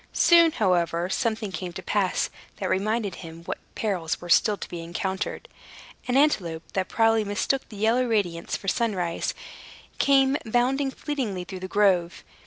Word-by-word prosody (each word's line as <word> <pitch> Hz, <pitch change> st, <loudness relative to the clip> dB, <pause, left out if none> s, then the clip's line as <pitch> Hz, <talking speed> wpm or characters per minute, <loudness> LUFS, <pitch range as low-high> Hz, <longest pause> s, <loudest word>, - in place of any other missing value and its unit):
Soon, 335 Hz, -2 st, +6 dB
however, 175 Hz, -3 st, +1 dB
something 220 Hz, -2 st, -1 dB
came 180 Hz, -1 st, -5 dB
to -, -, -7 dB
pass, -, -, 0 dB, 0.2 s
that -, -, -3 dB
reminded 210 Hz, +1 st, 0 dB
him 165 Hz, -1 st, -10 dB
what -, -, -5 dB, 0.2 s
perils 185 Hz, -7 st, -1 dB
were 175 Hz, -, -9 dB
still 205 Hz, +4 st, +4 dB
to -, -, -7 dB
be 170 Hz, -, -6 dB
encountered. 190 Hz, +3 st, -4 dB, 0.6 s
An 250 Hz, +1 st, +2 dB
antelope, 175 Hz, -, +2 dB
that 190 Hz, -1 st, -1 dB
probably 225 Hz, -1 st, +3 dB
mistook 205 Hz, +6 st, -1 dB
the 215 Hz, -, -10 dB
yellow 230 Hz, +4 st, +2 dB
radiance 185 Hz, -7 st, -1 dB
for 195 Hz, -, -11 dB
sunrise, 185 Hz, -6 st, -1 dB, 0.6 s
came 275 Hz, 0 st, +4 dB
bounding 255 Hz, +5 st, +1 dB
fleetly 260 Hz, -, -3 dB
through 185 Hz, +1 st, -8 dB
the 185 Hz, -, -5 dB
grove. 185 Hz, -4 st, +2 dB
205 Hz, 155 wpm, -25 LUFS, 180-235 Hz, 0.6 s, Soon